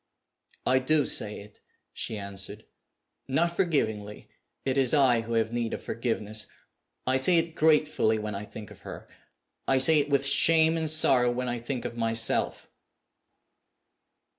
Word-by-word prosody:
"I 130 +1 +3
do 145 +2 +2
say 105 -1 -2
it!" 105 0 -16 0.3
she 110 - -3
answered. 100 +1 -5 0.6
"Not 170 +6 0
forgivingly 110 - -2 0.4
it 130 -1 0
is 135 0 +2
I 130 -5 +4
who 115 +1 -6
have 115 0 0
need 120 -1 -2
of - - -10
forgiveness. 110 -2 -3 0.6
I 130 +1 +2
say 170 +7 +3
it 165 0 0
gratefully 150 -8 +2
when 105 0 -4
I 100 +1 -6
think 105 0 -11
of - - -14
her - - -10 0.6
I 135 - +3
say 155 +4 +5
it 145 0 -1
with 140 -1 +1
shame 160 +3 +5
and 160 -1 -1
sorrow 130 -5 +3
when 125 +1 -3
I 120 -1 -3
think 120 +1 -5
of 120 -1 -6
myself." 115 0 0
125 Hz, 155 wpm, -27 LUFS, 110-150 Hz, 0.6 s, say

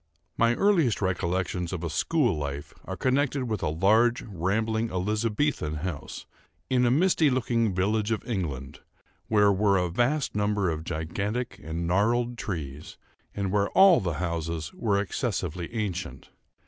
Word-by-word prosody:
My 115 +1 +3
earliest 170 - +3
recollections 90 -2 -1
of 90 -3 -4
a 85 - -2
school 125 - +1
life, 70 -1 -5
are 95 - -5
connected 135 +4 +1
with 110 -5 -3
a - - 0
large, 110 +9 +3
rambling, 110 +4 -1
Elizabethan 105 - -1
house, 90 -6 -5 0.5
in 125 -1 +3
a - - +4
misty 160 +2 +3
looking 115 -5 0
village 105 +3 +1
of 110 -2 -2
England, 75 - -4 0.5
where 105 -2 +4
were 100 0 +3
a 90 -1 0
vast 130 - +1
number 105 -3 +1
of 80 0 -5
gigantic 100 +8 -3
and 80 +2 -3
gnarled 115 +7 +1
trees, 75 -7 -6 0.4
and 100 -2 -2
where 100 0 +1
all 190 -3 +8
the 85 -4 -2
houses 85 -1 -3
were 100 -4 0
excessively 90 - -3
ancient. 95 - -4
100 Hz, 145 wpm, -27 LUFS, 85-115 Hz, 0.5 s, all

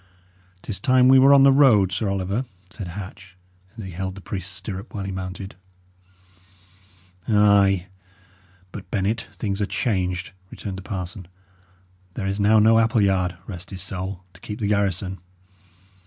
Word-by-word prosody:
"'Tis 105 - -5
time 130 -2 +4
we 130 0 +7
were 135 +2 +7
on 140 -1 +7
the 135 - +7
road, 120 -9 +5
Sir 105 +2 -1
Oliver," 100 +5 -1 0.3
said 100 -3 -7
Hatch, 95 0 -9 0.4
as 110 - -6
he 95 - -7
held 95 +2 -4
the - - -9
priest's 95 -1 -4
stirrup 95 +3 -6
while 100 - -3
he 95 - -4
mounted. 95 +1 -6 1.7
"Ay; 100 -3 +4 0.9
but, 95 -3 -9
Bennet, 105 +3 -1
things 100 -1 -3
are 100 - 0
changed," 90 -6 -1 0.2
returned 95 -2 -6
the - - -8
parson. 95 -2 -6 0.9
"There 105 - -3
is 100 +1 -2
now 105 +2 +4
no 110 +1 +5
Appleyard 95 -6 +2
rest 90 -2 -7
his 95 -2 -7
soul! 95 -1 -6
to 90 - -18
keep 105 0 -6
the 110 - -3
garrison. 100 -2 -1
100 Hz, 155 wpm, -23 LUFS, 95-105 Hz, 1.7 s, we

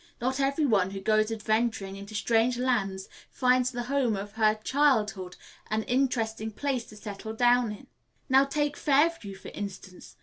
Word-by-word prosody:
"Not 260 +2 -1
every 275 +3 +1
one 200 -8 +2
who 195 0 -6
goes 215 +2 +2
adventuring 215 -2 -1
into 200 +2 -9
strange 230 +3 +2
lands 200 -7 -1 0.2
finds 255 -1 +2
the 245 -1 -4
home 255 -3 0
of 200 +1 -6
her 215 0 +2
chee 215 +4 -7
ildhood 210 -10 +2 0.3
an 220 0 0
interesting 230 -4 0
place 255 +1 -2
to 215 - -14
settle 210 +1 -7
down 245 0 +3
in. 210 - -10 0.4
Now 270 +1 +5
take 290 +1 -1
Fairview, 285 -8 +1
for 190 - -10
instance. 190 -2 -8
225 Hz, 165 wpm, -28 LUFS, 205-255 Hz, 0.4 s, Now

